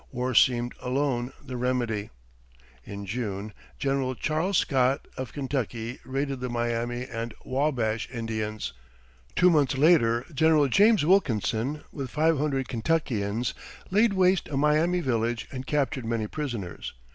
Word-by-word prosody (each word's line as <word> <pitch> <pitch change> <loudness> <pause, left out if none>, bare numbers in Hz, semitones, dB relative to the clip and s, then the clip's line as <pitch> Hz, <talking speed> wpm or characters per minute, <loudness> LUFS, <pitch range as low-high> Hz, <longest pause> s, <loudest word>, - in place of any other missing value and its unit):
War 125 0 -2
seemed 120 0 +4
alone 125 -1 -1
the 130 -2 -5
remedy. 120 -4 -1 0.7
In 100 +5 -7
June, 105 -1 -4 0.2
General 135 -2 0
Charles 160 +8 0
Scott, 135 +1 +2
of 130 -3 -5
Kentucky, 125 -4 -3
raided 135 0 -2
the 125 0 -3
Miami 120 +1 -1
and 115 -2 -5
Wabash 130 -5 0
Indians. 110 - -4 0.6
Two 180 0 +5
months 145 -4 +2
later 130 -6 +4
General 155 0 +4
James 205 - +5
Wilkinson, 140 - +1
with 135 -3 -5
five 155 +2 +2
hundred 135 -3 0
Kentuckians, 115 -4 -1 0.4
laid 210 +2 +4
waste 185 -1 +3
a 140 - -2
Miami 155 +5 +3
village 115 -5 -1
and 130 -1 -6
captured 135 -4 0
many 115 -1 -1
prisoners. 115 - -5
130 Hz, 130 wpm, -27 LUFS, 115-150 Hz, 0.7 s, Two